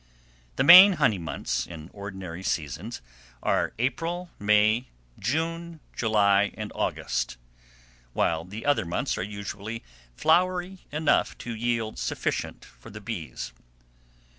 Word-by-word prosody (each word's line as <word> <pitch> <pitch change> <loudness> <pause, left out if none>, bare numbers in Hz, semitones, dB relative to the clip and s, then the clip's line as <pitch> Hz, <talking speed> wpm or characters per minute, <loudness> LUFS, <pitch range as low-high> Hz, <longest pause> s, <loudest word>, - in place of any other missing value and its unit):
The - - +2
main 185 +3 +11
honey 135 - +2
months, 85 -1 -3
in 80 -1 -10
ordinary 95 -4 -7
seasons, 85 - -3 0.4
are - - +1
April, 165 +9 -2
May, 105 +3 +3 0.3
June, 165 +7 -2 0.2
July, 100 -3 +3
and 110 -1 -5
August; - - -2 0.8
while 80 -1 +1
the 105 +6 -8
other 145 -6 +3
months 85 - -1
are - - -1
usually 100 +2 -6 0.3
flowery 180 - +1
enough 155 +1 +1
to 120 - -3
yield 115 -1 -2
sufficient - - -3
for - - -15
the 105 - -9
bees. 85 - -6
110 Hz, 115 wpm, -26 LUFS, 95-155 Hz, 0.8 s, main